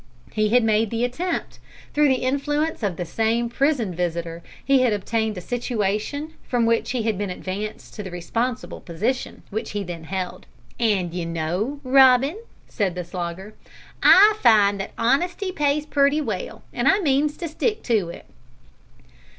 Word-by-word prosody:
He 215 -1 +1
had 245 +2 +4
made 220 0 +2
the 230 +2 -1
attempt. 335 +8 -3 0.3
Through 300 0 +4
the 260 -2 +1
influence 290 +4 0
of 200 -5 -1
the 175 - -3
same 225 +6 0
prison 250 -6 +1
visitor 170 -1 -3 0.2
he 275 -1 +4
had 245 -4 +3
obtained 220 +1 -1
a - - -5
situation, 240 - -2
from 240 -2 0
which 230 0 +1
he 250 -3 -1
had 215 -3 -1
been 205 -2 -2
advanced 195 +4 -6
to - - -6
the 195 - -6
responsible 230 +8 -3
position 220 +10 -3
which 215 0 -4
he 205 -1 -2
then 170 -3 -7
held. 185 +1 -5 0.3
"And, 200 -7 +1
d'you 175 -1 -3
know, 175 - -2
Robin," 265 - +5 0.3
said 195 -5 -1
the 180 - -3
Slogger, 175 +3 -6 0.5
"I 420 +2 +7
find 205 -4 +5
that 195 - -5
honesty 350 - +1
pays 295 -2 0
pretty 285 0 +2
well, 215 -11 -4
and 240 +3 0
I 390 - +6
means 295 -4 +1
to 345 - -4
stick 425 +8 -1
to 215 -8 +1
it." - - -10
230 Hz, 165 wpm, -23 LUFS, 190-275 Hz, 0.5 s, I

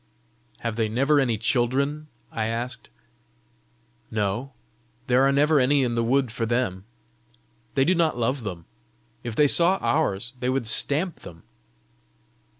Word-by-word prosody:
"Have 115 -1 -3
they 110 -2 0
never 135 +6 +2
any 120 -5 +1
children?" 135 +7 0 0.2
I 110 -1 -2
asked. 120 +2 -4 1.2
"No; 110 +5 -2 0.5
there 125 -1 +3
are - - +3
never 145 +2 +3
any 135 +2 +3
in 120 -2 -1
the 115 0 0
wood 130 0 +1
for 115 -1 -3
them. 110 -6 -1 0.9
They 135 -1 +3
do 185 - +3
not 165 -6 +1
love 120 +2 -1
them. 90 -6 -6 0.6
If 115 - -5
they 150 +2 +4
saw 175 +6 +5
ours, 120 -6 -1
they 125 - -1
would 130 -2 -1
stamp 145 +9 0
them." 85 -1 -12
125 Hz, 145 wpm, -24 LUFS, 115-140 Hz, 1.2 s, saw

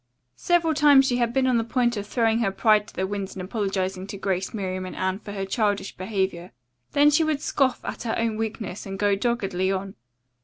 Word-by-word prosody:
Several 340 -2 +2
times 290 -3 +6
she 245 -2 +1
had 235 -1 +1
been 265 +1 +1
on 255 -2 +3
the - - 0
point 240 +1 +1
of 205 -1 -5
throwing 225 -1 +1
her 225 -4 +1
pride 210 +1 +3
to - - -15
the 190 - -1
winds 200 0 -4
and 185 - -5
apologizing 190 -2 -2
to 200 - -6
Grace, 190 -1 -2
Miriam 185 -3 -3
and 185 - -7
Anne 190 +1 -1
for 210 - -9
her 195 -1 -3
childish 205 0 -1
behavior. 190 - -3 0.4
Then 290 +1 +5
she 300 +2 +4
would 310 -2 0
scoff 270 -3 0
at - - -5
her 230 -2 -2
own 230 -1 0
weakness 215 -3 -4
and 195 0 -5
go 205 0 +2
doggedly 195 -4 0
on. 195 0 -3
205 Hz, 220 wpm, -25 LUFS, 190-240 Hz, 0.4 s, times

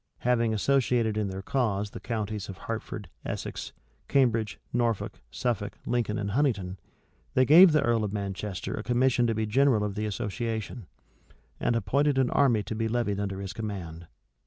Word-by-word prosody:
Having 115 -2 +2
associated 120 -1 +2
in 105 -1 0
their 95 0 -5
cause 105 -5 0
the - - -7
counties 105 -3 -3
of 95 - -7
Hertford, 110 -3 -5 0.2
Essex, - - -5 0.4
Cambridge, 115 -6 +2
Norfolk, 115 -3 -1
Suffolk, 105 - -2
Lincoln, 115 -3 0
and 100 -1 -2
Huntingdon, 100 -8 0 0.6
they 130 - +5
gave 170 +5 +9
the 150 -1 +3
earl 115 -2 +2
of 105 - -2
Manchester 100 -1 -4
a - - -3
commission 120 +1 +2
to 115 - 0
be 110 0 0
general 120 0 +3
of 105 -1 -2
the 105 +1 -2
association, 110 0 -4 0.7
and 120 - +1
appointed 135 +7 +1
an 130 -2 +2
army 120 -7 +3
to - - -5
be 115 +1 -1
levied 110 -3 0
under 100 -1 -3
his 100 0 -5
command. 90 -6 -6
110 Hz, 165 wpm, -28 LUFS, 100-120 Hz, 0.7 s, gave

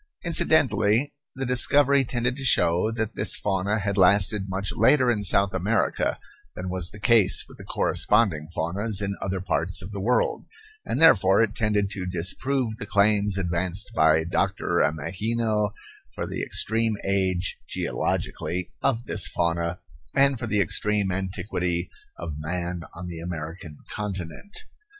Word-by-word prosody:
Incidentally 135 -6 +3 0.2
the 135 0 -3
discovery 140 +2 +3
tended 125 0 -1
to 135 - -7
show 90 -6 +3
that 110 -1 -3
this 105 - +1
fauna 100 +1 -1
had 100 -1 -2
lasted 100 +1 +3
much 95 +1 -2
later 125 +3 +4
in 105 -3 -2
South 100 0 +3
America 95 +4 0 0.4
than 90 +1 -5
was 90 -2 0
the 105 - -11
case 100 -2 +4
with - - -16
the - - -9
corresponding 100 -9 +1
faunas 95 +6 -1
in 100 -1 -3
other 95 0 -2
parts 90 -1 -1
of 95 +2 -5
the 100 - -6
world; 120 +6 0 0.4
and - - -3
therefore 100 -10 +5
it 105 -2 -2
tended 105 -3 0
to 95 -3 -4
disprove 110 +7 0
the 100 - -6
claims 100 -1 +2
advanced 90 +2 -2
by 80 0 +3
Doctor 90 0 -1
Ameghino 105 +7 -1 0.5
for - - -3
the - - -5
extreme 110 0 0
age, 95 -2 0
geologically, 90 0 -3
of 120 -3 0
this 90 -7 0
fauna, 85 +1 -1 0.3
and 140 -2 +3
for 120 - -4
the 105 -2 +1
extreme 100 +2 +1
antiquity 90 -2 -3 0.3
of 80 -3 -6
man 85 +2 -4
on 90 +2 -8
the 85 -2 -7
American 80 -2 -7
continent. 105 - -6
100 Hz, 145 wpm, -24 LUFS, 90-110 Hz, 0.5 s, therefore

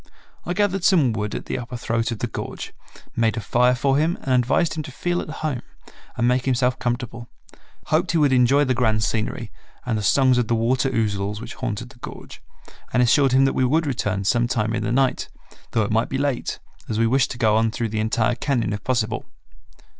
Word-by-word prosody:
I 175 - 0
gathered 195 -2 +1
some 160 - +4
wood 105 -1 -3
at - - -5
the - - -3
upper 125 0 -6
throat 115 -1 -1
of 115 - -3
the - - -2
gorge, - - -6 0.4
made 115 0 +1
a - - +1
fire 125 +4 +2
for 135 +2 +1
him 165 +3 +1
and 130 - 0
advised 125 +7 +2
him 155 - -3
to 145 -2 -8
feel 175 +6 -1
at - - -8
home 150 -5 -3 0.6
and 120 - +2
make 125 +1 +1
himself 125 -1 +1
comfortable, 120 -1 -3 0.6
hoped 165 +3 +1
he - - +3
would 145 -4 +3
enjoy 130 +3 +4
the 130 - +1
grand 110 -3 +1
scenery 110 +1 -2 0.3
and 115 -3 -1
the - - -3
songs 130 +4 +4
of 120 - 0
the 115 - +1
water 125 +4 +1
ouzels 105 -4 -1
which - - -8
haunted 120 -2 -4
the 125 - -18
gorge, - - -10 0.5
and 125 - +3
assured 135 +2 +4
him 135 +1 +5
that 135 - +1
we 130 - +1
would 155 +6 +2
return 105 -7 -1
some 120 +4 +2
time 115 -3 -1
in 115 - -1
the - - -2
night, 130 +1 +1 0.4
though 110 - +1
it 105 - -3
might 115 +2 +1
be 135 - -2
late, 140 -3 -1 0.3
as 110 - -1
we 115 - +3
wished 130 +3 +2
to - - -6
go 110 -3 +3
on 110 +1 +3
through 115 0 -3
the 110 +1 -3
entire 110 +2 +1
cañon 120 -4 -1
if 105 - -5
possible. 115 -4 -1
125 Hz, 220 wpm, -22 LUFS, 115-135 Hz, 0.6 s, him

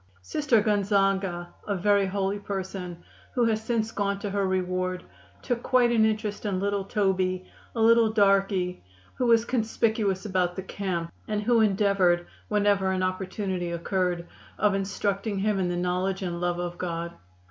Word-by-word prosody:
Sister 250 - +2
Gonzaga, 195 -4 +1 0.2
a 200 - 0
very 200 +1 +3
holy 195 +1 -1
person, 190 -3 -5 0.3
who 245 -2 +3
has 220 -1 +1
since 225 -1 -1
gone 200 -1 -1
to 200 0 -4
her 200 -1 0
reward, 185 0 -1 0.4
took 245 -2 -1
quite 245 -2 +3
an 225 -2 +4
interest 215 -1 -1
in 200 -3 -1
little 200 0 0
Toby, 185 -3 0 0.3
a - - -3
little 230 0 +5
darky, 195 - +2 0.4
who 250 - +2
was 230 -1 +5
conspicuous 220 -4 0
about 180 -3 0
the 190 - -4
camp, 180 -4 -3 0.2
and 210 -1 -1
who 235 +1 +4
endeavored, 195 -4 +3 0.2
whenever 205 -2 +2
an 185 0 0
opportunity 185 -1 -2
occurred, 175 0 -1 0.3
of 210 -1 +3
instructing 200 +1 -1
him 200 0 +1
in 185 - +1
the 175 - -1
knowledge 185 +2 -1
and 175 -1 -3
love 175 0 0
of 175 0 -4
God. 170 -1 -3
195 Hz, 160 wpm, -26 LUFS, 185-210 Hz, 0.4 s, little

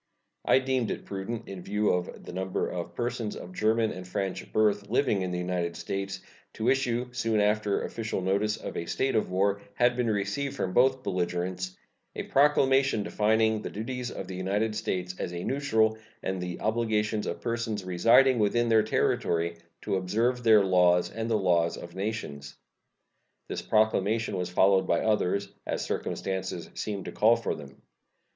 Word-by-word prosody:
I - - +5
deemed 130 -3 0
it - - -4
prudent, 100 +4 -5
in 95 -2 -7
view 105 +3 0
of 90 0 -3
the - - -8
number 95 0 -2
of 85 -1 -5
persons 120 -3 -2
of 90 - -9
German 110 +3 +2
and 90 0 -8
French 95 0 -3
birth 105 -2 +2
living 120 -4 +2
in 90 - -2
the 90 - -2
United 90 -1 -2
States, 95 +2 -4 0.3
to 110 +3 0
issue, 125 -2 +1
soon 115 -3 0
after 105 0 +1
official 115 -3 -3
notice 100 +3 0
of - - -7
a 85 - -4
state 130 +10 0
of 110 - +1
war 100 +2 +1
had 120 0 +3
been 120 -2 0
received 105 +7 -1
from 95 -8 -2
both 130 +1 +3
belligerents, 90 0 -2 0.4
a - - -3
proclamation 135 -4 +3
defining 110 +1 +2
the - - -5
duties 120 +3 -4
of - - -6
the 95 - -6
United 100 +4 -1
States 90 -4 -2
as 90 - -3
a 85 0 -4
neutral 110 -6 +1 0.2
and 95 -1 -2
the 90 -1 -4
obligations 110 -1 0
of - - -3
persons 115 -3 -2
residing 115 +8 +5
within 120 +3 +2
their 110 -1 +5
territory 85 -5 0 0.3
to 95 - 0
observe 115 +7 0
their 110 -3 +6
laws 90 -2 +3
and 115 0 -4
the 110 - +3
laws 85 -4 +2
of 85 - -9
nations. 95 -9 -5 0.9
This - - -3
proclamation 110 0 +1
was 90 -1 -2
followed 95 +1 +3
by 85 - +2
others, 100 -2 +1 0.2
as - - -2
circumstances 95 -3 -3
seemed 100 -3 -4
to - - -5
call 110 +2 +4
for 115 - -2
them. 70 -3 -11
105 Hz, 170 wpm, -28 LUFS, 95-115 Hz, 0.9 s, their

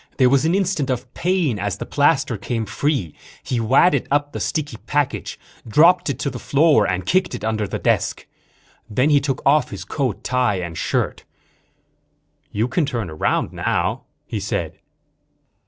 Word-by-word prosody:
There 130 -3 +5
was 140 +2 +3
an 165 +3 +2
instant 185 -8 0
of 125 -1 -3
pain 170 - 0
as 100 -1 -2
the - - -5
plaster 140 -4 +2
came 115 +2 -3
free. 105 - -1 0.3
He 125 - -2
wadded 135 +5 +3
up 145 +1 +1
the - - -5
sticky 155 -2 -2
package, 145 -2 -1 0.3
dropped 170 +8 +4
it 140 - -2
to 140 - -1
the 125 - -7
floor 150 +4 +3
and 90 0 -2
kicked 185 -1 +1
it - - -8
under 110 -1 -1
the - - -3
desk. - - 0 0.6
Then 125 +8 +2
he 145 - +6
took 135 -2 -2
off 145 0 +4
his 95 -3 -7
coat, 130 -1 -2
tie 125 -5 +1
and 85 -3 -5
shirt. - - -1 1.3
"You 110 +3 0
can 155 +3 0
turn 115 - -3
around 80 - -1
now," - - -1 0.2
he - - -4
said. - - -3
135 Hz, 170 wpm, -21 LUFS, 110-150 Hz, 1.3 s, he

